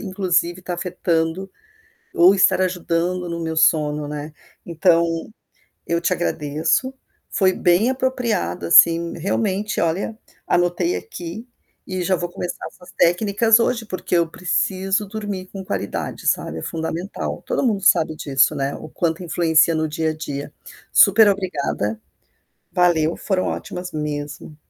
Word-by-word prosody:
inclusive, 185 -3 0
estar 180 0 -4
afetando, 175 +1 -1 0.7
ou 185 +3 +6
estar 190 - +4
ajudando 180 0 -1
no 170 0 -4
meu 160 -1 -3
sono, 150 -2 +2
né. 150 +1 -6 0.3
Então, 170 0 +3 0.8
eu 170 0 0
te 175 - 0
agradeço, 165 - 0 0.4
foi 190 -2 +2
bem 180 +8 +3
apropriado, 245 - -1
assim, 170 - +5
realmente. 200 +3 -1
Olha, 185 +6 -1 0.3
anotei 175 0 +1
aqui 175 +7 -7 0.4
e 185 -1 -3
já 185 +1 +1
vou 175 0 -3
começar 175 - -5
essas 180 - -14
técnicas 205 +5 +3
hoje, 235 -2 0
porque 185 -2 -4
eu 170 -1 +2
preciso 190 +3 -1
dormir 205 -2 -5
com 195 -1 -7
qualidade, 100 - -4
sabe. 80 - 0
É - - -7
fundamental, 165 +4 -4
todo - - -1
mundo 205 -4 +1
sabe 160 -4 +3
disso, 135 +1 +2
né, 140 0 -2
o 155 - -10
quanto 165 +2 -2
influencia 165 -1 +3
no 155 0 0
dia 160 +1 -1
a 155 - -3
dia. 145 -2 -6 0.4
Superobrigada. 185 - +3 0.7
Valeu, 170 -2 +2
foram 190 -3 -1
ótimas 180 -1 -5
mesmo. 150 0 -5
175 Hz, 135 wpm, -21 LUFS, 160-190 Hz, 0.8 s, ou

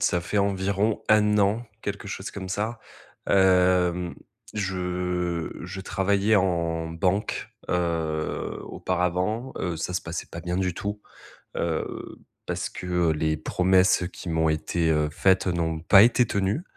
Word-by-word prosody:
ça 90 - +2
fait 100 +4 -1
environ 100 +2 +1
1 105 -1 +4
an, 105 +4 +2 0.2
quelque 100 0 -4
chose 95 0 -5
comme 95 -2 -6
ça. 110 +4 -2 0.5
Hem, 90 -2 +3 0.4
je 90 -3 -2
je 90 +2 -6
travaillais 100 +2 +1
en 85 -4 0
banque, 90 +5 -1 0.2
heu, 80 -3 -1
auparavant, 90 +7 -1
heu, 90 -2 -2
ça 90 +2 -3
se 90 - 0
passait 85 +1 -5
pas 85 - -8
bien 90 +1 -3
du 90 -2 0
tout, 105 +3 -4 0.6
heu, 85 -2 -3 0.3
parce - - -2
que 90 -2 0
les 80 0 0
promesses 90 +3 +3
qui - - -8
m'ont 80 -1 +2
été, 80 +2 0
heu, 75 -1 +2
faites 95 +3 +2
n'ont 80 -2 -1
pas 95 +4 +7
été 125 +1 +4
tenues, 100 - -1
90 Hz, 140 wpm, -26 LUFS, 85-100 Hz, 0.6 s, pas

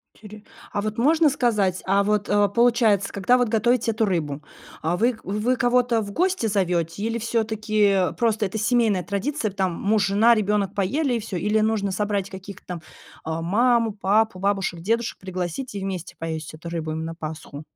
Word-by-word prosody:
Тюрю, 210 0 -12 0.3
а 205 - 0
вот 215 0 -4
можно 310 +5 +4
сказать, 210 -9 +1
а, 200 +1 +3
вот, 210 0 0
э, 205 0 +3
получается, 230 -3 +2
когда 205 +6 +3
вот 245 - +2
готовите 230 +2 +2
эту 220 +1 -1
рыбу, 150 -6 -2 0.4
а, 165 +3 0
вы 235 +3 +2
вы 210 +6 0
кого-то 245 -1 +2
в 200 - -6
гости 365 - 0
зовете? 180 -2 -1
Или 230 +1 -1
всё-таки 215 -4 +1
просто 225 -3 +1
это 195 +3 -4
семейная 220 -4 +2
традиция, 215 +3 -2
там 190 -2 -1
муж, 205 +2 +1
жена, 225 +4 +5
ребенок 205 -2 0
поели 250 +8 0
и 235 - 0
всё? 205 -4 -5
Или 210 +3 +1
нужно 215 -2 0
собрать 200 0 -1
каких-то 190 0 -10
там, 175 -3 -5 0.4
а, 160 +1 -3
маму, 230 +5 +2
папу, 205 0 +1
бабушек, 195 -3 -1
дедушек 230 +4 -1
пригласить 185 +6 -5
и 200 - -3
вместе 190 -3 -5
поесть 160 -2 -5
эту 155 +2 -10
рыбу 160 -2 -4
им 160 +1 -3
на 165 0 -6
Пасху? 155 -2 -7
205 Hz, 180 wpm, -23 LUFS, 185-230 Hz, 0.4 s, жена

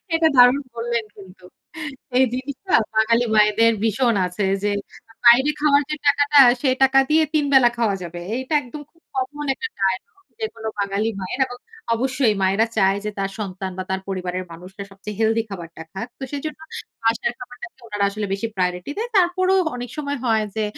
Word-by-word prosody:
এটা 325 0 +4
দারুন 245 +3 +7
বললেন 235 -1 -2
কিন্তু। 185 -2 -14 0.7
এই 260 - +6
জিনিসটা 275 +8 -5 0.2
বাঙালি 230 +2 +3
মায়েদের 215 +2 +5
ভীষণ 230 +1 +2
আছে 185 +3 -2 0.2
যে, 205 - +2 0.6
বাইরে 260 +5 +7
খাওয়ার 290 -1 +4
যে 305 - -1
টাকাটা 285 +1 +4 0.2
সেই 260 -3 +2
টাকা 265 0 +5
দিয়ে 315 +1 +4
তিন 300 -2 +2
বেলা 250 -2 +7
খাওয়া 220 -4 +1
যাবে। 175 0 -7 0.2
এটা 260 +4 -5
একদম 290 +3 -9
খুব 330 - -31
কমন 290 +3 -3
একটা 455 - -4
ডায়ালগ 190 - -1 0.2
যেকোনো 225 - -5
বাঙালি 200 +2 0
মায়ের। 185 +8 -5
এবং 245 0 -9 0.4
অবশ্যই 255 -3 +1
মায়েরা 195 +4 +3
চায় 195 -1 +3
যে, - - -1
তার 195 0 -2
সন্তান 190 -2 -4
বা 185 - -3
তার 190 0 -1
পরিবারের 185 -1 -3
মানুষরা 185 +4 -9
সবচেয়ে 200 +1 -8
হেলথি 225 0 +2
খাবারটা 170 -4 -8
খাক। 210 +5 -5
তো - - -6
সেজন্য 300 +2 -5 0.4
বাসার 230 +1 +1
খাবারটাকে 245 -1 -10
ওনারা 205 -2 0
আসলে 205 +1 -4
বেশি 215 +4 -2
প্রায়োরিটি 180 +5 -2
দেয়। 465 +2 -3
তারপরও 370 +1 +3 0.2
অনেক 245 0 -6
সময় 285 -1 -3
হয় 220 -2 +2
যে, 220 - 0
230 Hz, 175 wpm, -22 LUFS, 195-270 Hz, 0.7 s, দারুন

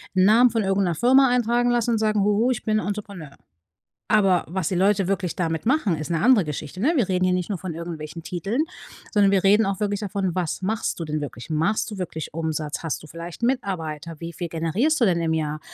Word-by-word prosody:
'n 185 0 +5
Namen 235 +4 +6
von 225 - 0
irgend 195 0 +1
'ner 175 -3 0
Firma 260 - +5
eintragen 245 0 +2
lassen 240 -1 +1
und 225 - +1
sagen: 215 -1 +1
„Huhu, 210 +5 +2
ich 245 - -3
bin 215 -1 +1
Entrepreneur.“ 200 -8 -6 0.7
Aber 195 -5 +3
was 180 -1 -2
die 185 - -2
Leute 195 +1 +2
wirklich 190 -3 -1
damit 165 -3 -2
machen, 225 - +2
ist 155 +2 -6
'ne 165 -2 0
andere 235 -2 +5
Geschichte, 150 +3 -6
ne? 280 +10 +3
Wir 235 -9 +2
reden 185 -1 +1
hier 185 - +2
nicht 180 -1 -2
nur 205 - -2
von 180 0 -5
irgendwelchen 165 -1 -7
Titeln, 195 - -2 0.5
sondern 205 -3 +4
wir 195 -2 +3
reden 205 +3 +5
auch 195 0 -2
wirklich 205 -1 -1
davon, 195 -3 -2
was 180 -4 -2
machst 215 -2 -2
du - - -2
denn 155 0 -2
wirklich? 125 -4 -7
Machst 165 +9 0
du 210 - -6
wirklich 160 -5 -5
Umsatz? 155 -2 -3
Hast 165 -3 -3
du - - -11
vielleicht 170 +5 -9
Mitarbeiter? 170 - -2
Wie 170 0 -6
viel 175 - -4
generierst 175 - 0
du - - +5
denn 170 -3 +1
im 160 -1 0
Jahr? 155 -1 -2
190 Hz, 230 wpm, -23 LUFS, 165-215 Hz, 0.7 s, Namen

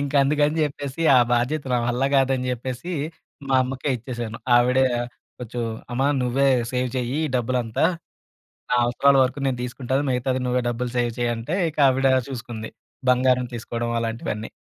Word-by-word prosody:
ఇంక 140 0 -3
అందుకని 150 +2 +2
చెప్పేసి 145 +1 -4
ఆ - - +8
బాధ్యత 125 +5 +1
నా 125 - +3
వల్ల 120 +2 0
కాదని 130 -1 +1
చెప్పేసి 130 +7 -5 0.6
మా 135 - +2
అమ్మకే 130 +2 -3
ఇచ్చేసాను. 120 -1 -6 0.2
ఆవిడ 125 +2 +3 0.6
కొంచెం, 120 0 -5 0.3
అమ్మా! 135 +3 +1
నువ్వే 135 +3 +2 0.2
సేవ్ 125 0 0
చెయ్యి 125 +2 -2
ఈ - - -3
డబ్బులంతా. 120 +1 0 0.9
నా - - +2
అవసరాల 140 +3 +3
వరకు 130 +2 -2
నేను 130 - -1
తీసుకుంటాను, 130 +2 -2
మిగతాది 130 +1 0
నువ్వే 125 0 +1
డబ్బులు 120 +1 -3
సేవ్ 120 -1 +1
చేయి 120 -1 +1
అంటే 115 +10 -3
ఇంక 155 - -8
ఆవిడ 135 +1 +2 0.2
చూసుకుంది. 115 -4 -6 0.4
బంగారం 125 0 +3
తీసుకోవడం 115 0 -4
అలాంటివన్నీ. 115 -1 -3
125 Hz, 150 wpm, -23 LUFS, 120-135 Hz, 0.9 s, ఆ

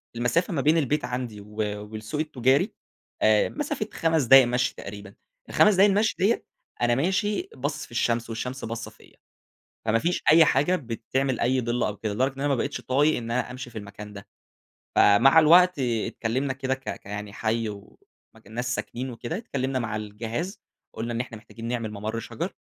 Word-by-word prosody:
المسافة 145 - 0
ما 140 - 0
بين 155 +4 +4
البيت 150 0 0
عندي 125 -4 -4
و 105 +1 -15 0.4
والسوق 110 +6 -5
التجاري، 135 -3 +1 0.5
آآ 110 -1 +4
مسافة 290 -7 -3
5 160 -3 +1
دقايق 135 +1 +8
مَشي 125 +1 0
تقريبًا، 100 0 -9 0.4
ال5 210 - +5
دقايق 200 +2 +6
المشي 210 +2 +2
ديَّة، 205 +5 +2 0.4
أنا 120 0 +3
ماشي 190 +8 0
باصِص 145 +3 -3
في - - -21
الشمس 115 0 0
والشمس 125 +4 -4
باصَّة 115 +1 -5
فيَّ، - - -20 0.7
فما 115 +1 +2
فيش 175 +3 0
أي 160 0 +8
حاجة 145 +7 +2
بتعمل 130 -1 -2
أي 130 +2 +2
ضِلّ 120 +1 -1
أو 105 - -2
كده، 105 0 -3
لدرجة 130 +5 0
إن 135 - -12
أنا 145 - 0
ما 140 - +2
بقيتش 140 +4 -3
طايق 145 +4 +2
إن 115 -1 -5
أنا 125 +1 -1
أمشي 125 -1 -7
في 115 - -10
المكان 105 0 -9
ده، 100 0 -10 0.7
فمع 135 +10 +6
الوقت 175 +1 +6
آآ 120 -3 0
اتكلمنا 125 +4 -2
كده 135 0 -2
ك 135 - -6 0.2
ك - - -38
يعني 105 0 -6
حي 110 +1 -1
ومكان 105 +1 -15
ناس 125 +2 -1
ساكنين 130 +2 -5
وكده، 120 +8 -5
اتكلمنا 135 - -2
مع 110 -3 -3
الجهاز، 110 - -5 0.3
قُلنا 115 +1 -4
إن 115 - -2
إحنا 115 -3 -8
محتاجين 115 +2 -10
نعمل 115 -3 -2
ممر 110 +2 -4
شجر، 170 - -5
125 Hz, 185 wpm, -26 LUFS, 115-145 Hz, 0.7 s, دقايق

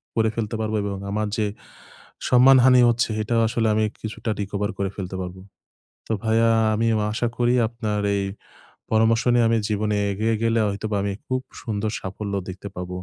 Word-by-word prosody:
করে 110 -1 +2
ফেলতে 115 -1 -2
পারব 110 0 -2
এবং 100 -1 -3
আমার 105 +1 -1
যে 110 - +1 0.8
সম্মানহানি 125 0 +7
হচ্ছে 120 0 +1
এটাও 115 +2 +1
আসলে 115 0 0
আমি 110 - +2 0.2
কিছুটা 110 +1 -5
recover 100 0 -2
করে 100 -1 -1
ফেলতে 95 -1 -5
পারব। 90 0 -6 0.7
তো - - -4
ভাইয়া 115 +1 +3 0.3
আমি 115 +2 0
ন - - 0
আশা 120 +2 0
করি 120 0 +2
আপনার 110 -3 -3
এই 100 - 0 0.7
পরামর্শ 110 +1 +3
নিয়ে 120 -1 +4
আমি 115 - +3
জীবনে 105 0 0 0.2
এগিয়ে 110 +3 0
গেলে 115 0 +2
হয়তোবা 105 +1 -2
আমি 100 -1 -1
খুব 130 0 -1 0.2
সুন্দর 105 -1 -2
সাফল্য 100 +2 -5 0.2
দেখতে 95 +2 -7
পাব 90 0 -5
110 Hz, 170 wpm, -23 LUFS, 100-115 Hz, 0.8 s, সম্মানহানি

